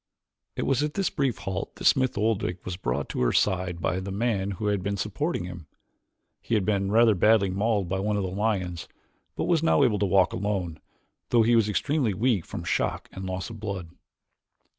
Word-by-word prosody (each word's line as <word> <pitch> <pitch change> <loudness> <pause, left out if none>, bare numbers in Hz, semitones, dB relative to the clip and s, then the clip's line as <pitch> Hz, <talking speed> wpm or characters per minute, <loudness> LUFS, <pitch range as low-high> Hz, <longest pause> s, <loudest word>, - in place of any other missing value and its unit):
It - - -2
was 135 0 +1
at 150 0 -2
this 195 -1 0
brief 135 -7 0
halt 95 0 -5
that - - -8
Smith 130 -4 +3
Oldwick 105 -4 -1
was 90 - -3
brought 60 -9 -2
to - - -3
her - - +3
side 90 -3 +1
by 90 +2 -1
the 95 +1 -5
men 100 -2 0
who 105 - -4
had 100 -2 +1
been 100 +1 -2
supporting 105 - -2
him. 90 -3 -8 0.7
He 115 - -1
had 100 -3 +1
been 100 -2 0
rather 115 0 +5
badly 100 0 +3
mauled 100 0 0
by 95 +2 -1
one 105 +1 0
of 100 - -1
the 95 - -2
lions; 95 -4 -2 0.5
but - - -2
was 170 -3 +2
now 160 -3 +4
able 110 -6 +2
to 100 - +1
walk 95 -1 +3
alone, 95 -5 -2 0.5
though 120 -2 +4
he 120 +2 +4
was 110 -2 +3
extremely 125 0 0
weak 110 -4 +1
from - - -6
shock - - -1
and 95 - -7
loss 95 +4 -4
of 110 - -9
blood. 100 -5 -5
100 Hz, 205 wpm, -26 LUFS, 95-115 Hz, 0.7 s, rather